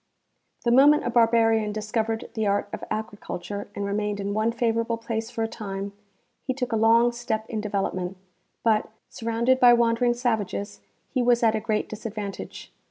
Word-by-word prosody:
The 235 Hz, -, +3 dB
moment 285 Hz, +4 st, +6 dB
a 240 Hz, -, 0 dB
barbarian 225 Hz, -2 st, +3 dB
discovered 220 Hz, +1 st, -2 dB
the 220 Hz, -3 st, -1 dB
art 200 Hz, 0 st, 0 dB
of -, -, -5 dB
agriculture 205 Hz, -2 st, -5 dB
and 200 Hz, -, -3 dB
re 200 Hz, -, -2 dB
mained 210 Hz, 0 st, -1 dB
in 200 Hz, 0 st, -2 dB
one 215 Hz, +2 st, +1 dB
favorable 230 Hz, -1 st, 0 dB
place 225 Hz, -1 st, -4 dB
for 225 Hz, -, -3 dB
a -, -, 0 dB
time, 200 Hz, -3 st, -6 dB, 0.5 s
he 260 Hz, -, -3 dB
took 250 Hz, -2 st, -3 dB
a -, -, +1 dB
long 230 Hz, +2 st, +5 dB
step 235 Hz, -2 st, -3 dB
in 220 Hz, -2 st, -3 dB
development; 195 Hz, -3 st, -2 dB, 0.5 s
but, 220 Hz, -2 st, +2 dB, 0.2 s
surrounded 235 Hz, +3 st, +1 dB
by 245 Hz, -1 st, +8 dB
wandering 235 Hz, +1 st, +3 dB
savages, 220 Hz, -4 st, -2 dB, 0.3 s
he 255 Hz, -, +1 dB
was 240 Hz, 0 st, +3 dB
at 225 Hz, -1 st, +4 dB
a 220 Hz, -, 0 dB
great 215 Hz, -1 st, -1 dB
disadvantage. 210 Hz, -2 st, -7 dB
225 Hz, 170 wpm, -25 LUFS, 210-235 Hz, 0.5 s, by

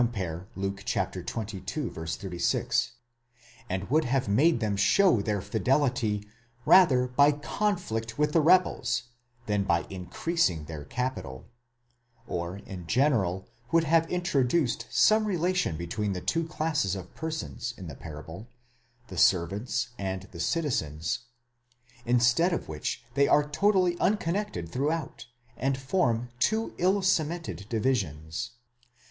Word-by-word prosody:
Luke 95 Hz, 0 st, -3 dB
xxii. -, -, -2 dB
36),?° 95 Hz, -, -2 dB, 0.8 s
and 95 Hz, +1 st, -2 dB
would 155 Hz, +2 st, +3 dB
have 130 Hz, 0 st, 0 dB
made 135 Hz, +8 st, +3 dB
them 105 Hz, -3 st, 0 dB
show 120 Hz, -, +4 dB
their 100 Hz, -2 st, -1 dB
fidelity 115 Hz, -4 st, 0 dB, 0.4 s
rather 135 Hz, -9 st, +6 dB
by 140 Hz, +4 st, +4 dB
conflict 140 Hz, -, -2 dB
with 150 Hz, 0 st, +2 dB
the 165 Hz, -, +5 dB
rebels, 150 Hz, -8 st, +3 dB, 0.4 s
than 105 Hz, -1 st, +1 dB
by 85 Hz, -3 st, +1 dB
increasing 90 Hz, -, -1 dB
their 75 Hz, -2 st, -7 dB
capital; 120 Hz, -, -4 dB, 0.8 s
or 85 Hz, -2 st, -4 dB
in 95 Hz, -4 st, -9 dB
general 105 Hz, -, +1 dB, 0.2 s
would 165 Hz, 0 st, +4 dB
have 165 Hz, +1 st, +3 dB
introduced 150 Hz, -6 st, +1 dB
some 215 Hz, 0 st, +4 dB
relation 180 Hz, -, 0 dB
between 100 Hz, +5 st, -2 dB
the 90 Hz, -, -3 dB
two 165 Hz, -, 0 dB
classes 155 Hz, -, 0 dB
of 90 Hz, -2 st, -8 dB
persons 155 Hz, -6 st, -4 dB
in 95 Hz, -, -8 dB
the 80 Hz, -, -7 dB
parable, 80 Hz, -, -9 dB, 0.6 s
the -, -, -5 dB
servants 105 Hz, +8 st, +2 dB
and 95 Hz, -1 st, -3 dB
the 85 Hz, -, -10 dB
citizens; 85 Hz, -, -1 dB, 0.8 s
instead 125 Hz, +8 st, +4 dB
of 170 Hz, -, -2 dB
which, 75 Hz, -1 st, -4 dB
they 140 Hz, 0 st, +3 dB
are 150 Hz, 0 st, +4 dB
totally 185 Hz, +2 st, +2 dB
unconnected 190 Hz, -, 0 dB
throughout, 150 Hz, +2 st, -2 dB, 0.3 s
and 135 Hz, +2 st, 0 dB
form 125 Hz, -5 st, 0 dB
two 220 Hz, +10 st, +1 dB
ill 190 Hz, +3 st, +2 dB
cemented 160 Hz, -, 0 dB
divisions. 105 Hz, -, -1 dB
125 Hz, 120 wpm, -28 LUFS, 95-160 Hz, 0.8 s, rather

